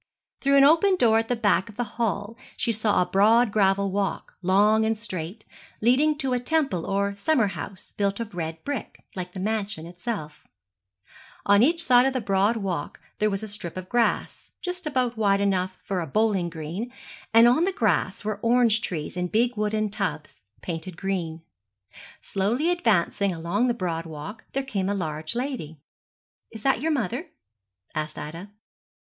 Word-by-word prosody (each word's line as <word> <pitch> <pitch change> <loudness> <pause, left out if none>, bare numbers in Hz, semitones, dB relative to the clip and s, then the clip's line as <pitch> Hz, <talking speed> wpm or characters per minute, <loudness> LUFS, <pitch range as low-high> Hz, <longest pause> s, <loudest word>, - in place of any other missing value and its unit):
Through 275 0 +4
an 275 - +7
open 335 +7 +5
door 225 -9 +4
at 225 - -2
the 245 - +1
back 205 -2 +2
of 215 - -13
the 245 - 0
hall 220 -1 -2 0.2
she 235 - +1
saw 215 -4 +2
a - - -5
broad 220 +5 +4
gravel 200 -1 +2
walk, 200 0 -2
long 205 +4 +4
and 220 0 +1
straight, 190 -1 -5 0.3
leading 280 +7 +3
to 270 -3 0
a 250 - +1
temple 270 - 0
or 200 +1 0
summer 235 +5 +2
house 185 +3 -8
built 200 0 -1
of 225 -3 -5
red 160 -2 -5
brick, 285 -5 -5
like 180 -1 -5
the 190 - -6
mansion 205 -4 -2
itself. 175 -3 -6 1.0
On 200 +1 +5
each 335 +6 +3
side 250 0 +5
of 270 - 0
the 260 - 0
broad 200 +1 +2
walk 180 -8 -3 0.2
there 215 - +3
was 195 +1 -3
a - - -4
strip 190 -4 -3
of 185 0 -7
grass, 240 -1 0
just 360 -2 -4
about 250 -5 0
wide 200 -2 +3
enough 185 -2 0
for 195 -3 -2
a 165 - -3
bowling 200 0 +1
green, 170 +9 -5 0.4
and 230 +1 +7
on 255 +8 +4
the 390 - +1
grass 205 - 0
were 210 -1 -2
orange 230 -2 +3
trees 160 -6 -4
in 180 0 -1
big 235 +6 +1
wooden 215 0 0
tubs, 170 -8 -3 0.2
painted 165 0 -5
green. 170 -4 -3 0.8
Slowly 235 - 0
advancing 205 - +1
along 175 +8 0
the 240 - +1
broad 170 -5 -3
walk 160 +8 -8
there 275 - -1
came 200 -7 -2
a 205 - 0
large 155 -2 -2
lady. 240 - -4 0.7
'Is 220 -2 -11
that 270 -3 +2
you 320 - 0
mother?' 270 - -1 0.7
asked 155 0 -4
Ida. 165 +6 -7
205 Hz, 175 wpm, -25 LUFS, 185-240 Hz, 1.0 s, an